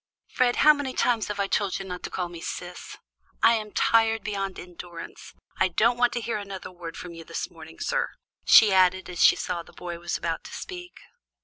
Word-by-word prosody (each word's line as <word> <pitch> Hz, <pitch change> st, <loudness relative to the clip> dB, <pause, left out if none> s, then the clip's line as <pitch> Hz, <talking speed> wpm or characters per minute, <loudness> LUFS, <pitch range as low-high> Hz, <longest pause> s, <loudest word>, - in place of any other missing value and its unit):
"Fred, 250 Hz, -2 st, +3 dB
how 305 Hz, -, +7 dB
many 285 Hz, -3 st, -4 dB
times 230 Hz, -4 st, +1 dB
have 210 Hz, -1 st, -4 dB
I 200 Hz, -, +2 dB
told 195 Hz, -1 st, 0 dB
you 195 Hz, -, -6 dB
not 180 Hz, -1 st, -6 dB
to -, -, -5 dB
call 180 Hz, -1 st, -3 dB
me 170 Hz, -1 st, -10 dB
'Sis?' 180 Hz, +1 st, -7 dB, 0.5 s
I 230 Hz, -, +7 dB
am 215 Hz, -2 st, -2 dB
tired 225 Hz, -1 st, +3 dB
beyond 195 Hz, -2 st, -3 dB
endurance. 175 Hz, -1 st, -10 dB, 0.2 s
I -, -, +3 dB
don't 220 Hz, +7 st, +2 dB
want 245 Hz, 0 st, +3 dB
to 240 Hz, -, -2 dB
hear 230 Hz, -1 st, -2 dB
another 195 Hz, -2 st, -7 dB
word 175 Hz, -2 st, -8 dB
from 175 Hz, -1 st, -8 dB
you 165 Hz, 0 st, -9 dB
this 165 Hz, +1 st, -5 dB
morning, 160 Hz, -1 st, -13 dB
sir," -, -, 0 dB, 0.3 s
she 215 Hz, -3 st, +7 dB
added 185 Hz, 0 st, +3 dB
as 175 Hz, -, +1 dB
she -, -, +7 dB
saw 175 Hz, -2 st, -3 dB
the -, -, -16 dB
boy 175 Hz, -1 st, -7 dB
was 175 Hz, 0 st, -2 dB
about 165 Hz, -1 st, -3 dB
to -, -, -10 dB
speak. 355 Hz, -1 st, -8 dB
190 Hz, 215 wpm, -26 LUFS, 175-225 Hz, 0.5 s, how